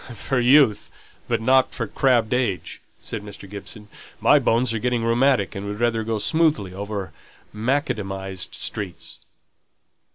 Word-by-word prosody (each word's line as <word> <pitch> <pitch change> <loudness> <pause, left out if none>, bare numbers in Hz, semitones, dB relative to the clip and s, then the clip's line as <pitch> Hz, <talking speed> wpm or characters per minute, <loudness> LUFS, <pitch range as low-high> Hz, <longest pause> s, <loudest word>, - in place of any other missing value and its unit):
"For 135 +3 -1
youth, 125 -4 +4 0.4
but - - 0
not 130 +3 +3
for 115 - -2
crabbed 120 -1 +2
age," 120 -8 -2 0.2
said 110 - -6
Mr. 105 -1 -10
Gibson. 105 +1 -8 0.3
"My - - +5
bones 115 0 +1
are 115 - -1
getting 120 0 0
rheumatic, 120 -2 +2
and 100 -1 -6
would 105 +1 -5
rather 115 -1 +1
go 110 0 -2
smoothly 150 - +2
over 100 -3 -5 0.4
macadamized 100 -6 -2
streets." 100 -4 -5
110 Hz, 135 wpm, -23 LUFS, 100-125 Hz, 0.4 s, My